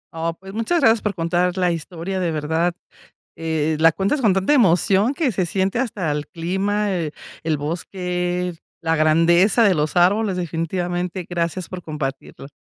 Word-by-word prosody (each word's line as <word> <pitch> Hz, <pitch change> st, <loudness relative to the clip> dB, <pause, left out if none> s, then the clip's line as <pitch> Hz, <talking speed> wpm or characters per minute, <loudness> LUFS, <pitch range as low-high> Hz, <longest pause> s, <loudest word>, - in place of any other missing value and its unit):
Oh, 165 Hz, 0 st, -2 dB
pues, 190 Hz, 0 st, -11 dB
muchas 230 Hz, +11 st, 0 dB
gracias 225 Hz, -6 st, +4 dB
por 210 Hz, -2 st, -2 dB
contar 175 Hz, +1 st, 0 dB
la 180 Hz, -1 st, +2 dB
historia, 170 Hz, +3 st, -4 dB
de 180 Hz, -2 st, 0 dB
verdad, 160 Hz, +3 st, 0 dB, 0.6 s
eh, 160 Hz, -1 st, -1 dB
la 165 Hz, 0 st, +6 dB
cuentas 200 Hz, -, 0 dB
con 215 Hz, -7 st, +3 dB
tanta 195 Hz, +8 st, +1 dB
emoción 200 Hz, -, +3 dB
que 280 Hz, -5 st, 0 dB
se 185 Hz, -2 st, 0 dB
siente 190 Hz, +4 st, 0 dB
hasta 220 Hz, -10 st, -1 dB
el 150 Hz, 0 st, -3 dB
clima, 195 Hz, +4 st, -1 dB
eh, 165 Hz, -4 st, -2 dB, 0.3 s
el 160 Hz, -1 st, +1 dB
bosque, 180 Hz, +3 st, -3 dB, 0.3 s
la 165 Hz, 0 st, +1 dB
grandeza 165 Hz, +7 st, +4 dB
de 200 Hz, -, +5 dB
los 150 Hz, +2 st, -1 dB
árboles, 190 Hz, +3 st, +3 dB
definitivamente, 175 Hz, +1 st, -3 dB
gracias 175 Hz, 0 st, -2 dB
por 185 Hz, -, -6 dB
compartirlo. 135 Hz, -3 st, -6 dB
180 Hz, 160 wpm, -21 LUFS, 165-195 Hz, 0.6 s, la